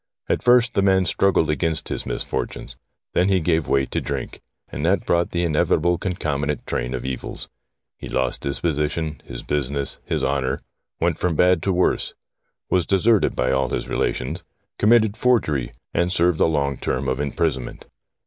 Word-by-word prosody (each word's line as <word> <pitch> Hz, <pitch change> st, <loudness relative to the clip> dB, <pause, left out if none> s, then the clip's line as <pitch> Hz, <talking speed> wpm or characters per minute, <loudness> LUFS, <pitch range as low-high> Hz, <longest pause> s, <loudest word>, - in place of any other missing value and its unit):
At -, -, 0 dB
first 125 Hz, 0 st, +4 dB
the -, -, +2 dB
man 95 Hz, -1 st, +3 dB
struggled 90 Hz, -2 st, +2 dB
against 80 Hz, 0 st, -1 dB
his -, -, -4 dB
misfortunes; -, -, -4 dB, 0.4 s
then 90 Hz, +2 st, +3 dB
he 95 Hz, -1 st, +3 dB
gave 80 Hz, -2 st, +1 dB
way 70 Hz, -1 st, +2 dB
to -, -, -3 dB
drink, -, -, -5 dB, 0.3 s
and 75 Hz, -, -6 dB
that 90 Hz, +4 st, +2 dB
brought 85 Hz, 0 st, +2 dB
the 85 Hz, 0 st, -1 dB
inevitable 85 Hz, +1 st, +2 dB
concomitant 75 Hz, -6 st, -2 dB
train 60 Hz, +2 st, -2 dB
of 65 Hz, -, -5 dB
evils. 65 Hz, -1 st, -4 dB, 0.5 s
He -, -, -7 dB
lost 65 Hz, -1 st, -1 dB
his 70 Hz, 0 st, -2 dB
position, 75 Hz, 0 st, -1 dB
his -, -, -7 dB
business, 70 Hz, -1 st, -2 dB
his -, -, -2 dB
honour; 65 Hz, 0 st, 0 dB, 0.4 s
went 85 Hz, -1 st, +1 dB
from 90 Hz, -2 st, 0 dB
bad 90 Hz, 0 st, +4 dB
to 95 Hz, -, 0 dB
worse; 90 Hz, 0 st, +1 dB, 0.5 s
was 90 Hz, -3 st, +1 dB
deserted 105 Hz, +2 st, +3 dB
by 65 Hz, -, +1 dB
all 65 Hz, 0 st, +1 dB
his -, -, -3 dB
relations; -, -, -2 dB, 0.4 s
com 105 Hz, -, +3 dB
mitted 110 Hz, -3 st, +5 dB
forgery, 75 Hz, -, +1 dB, 0.2 s
and 85 Hz, +1 st, +1 dB
served 90 Hz, -2 st, +2 dB
a -, -, +5 dB
long 70 Hz, -4 st, 0 dB
term 65 Hz, +2 st, -2 dB
of 65 Hz, +2 st, 0 dB
imprisonment. 65 Hz, -3 st, -2 dB
80 Hz, 170 wpm, -22 LUFS, 70-90 Hz, 0.5 s, mitted